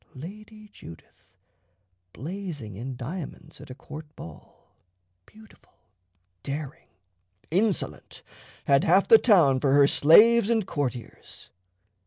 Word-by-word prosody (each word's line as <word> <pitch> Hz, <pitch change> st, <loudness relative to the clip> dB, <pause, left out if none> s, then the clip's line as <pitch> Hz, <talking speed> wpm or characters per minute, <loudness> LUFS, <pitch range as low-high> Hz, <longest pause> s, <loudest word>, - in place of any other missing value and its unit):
Lady 215 Hz, +8 st, -12 dB
Judith, 80 Hz, 0 st, -16 dB, 0.8 s
blazing 155 Hz, -, -8 dB
in 125 Hz, +6 st, -7 dB
diamonds 155 Hz, +4 st, -9 dB
at -, -, -14 dB
a 125 Hz, -, -9 dB
court 150 Hz, +2 st, -12 dB
ball, 80 Hz, -3 st, -15 dB, 0.5 s
beautiful, 220 Hz, 0 st, -21 dB, 0.7 s
daring, 145 Hz, -, -7 dB, 0.6 s
insolent, 185 Hz, -, -3 dB, 0.4 s
had 140 Hz, 0 st, +3 dB
half 185 Hz, +4 st, +3 dB
the 225 Hz, -, +7 dB
town 165 Hz, -, +3 dB
for 135 Hz, 0 st, 0 dB
her 140 Hz, 0 st, +5 dB
slaves 215 Hz, +11 st, +5 dB
and 225 Hz, -4 st, 0 dB
courtiers. 125 Hz, -, -7 dB
155 Hz, 105 wpm, -25 LUFS, 135-200 Hz, 0.8 s, the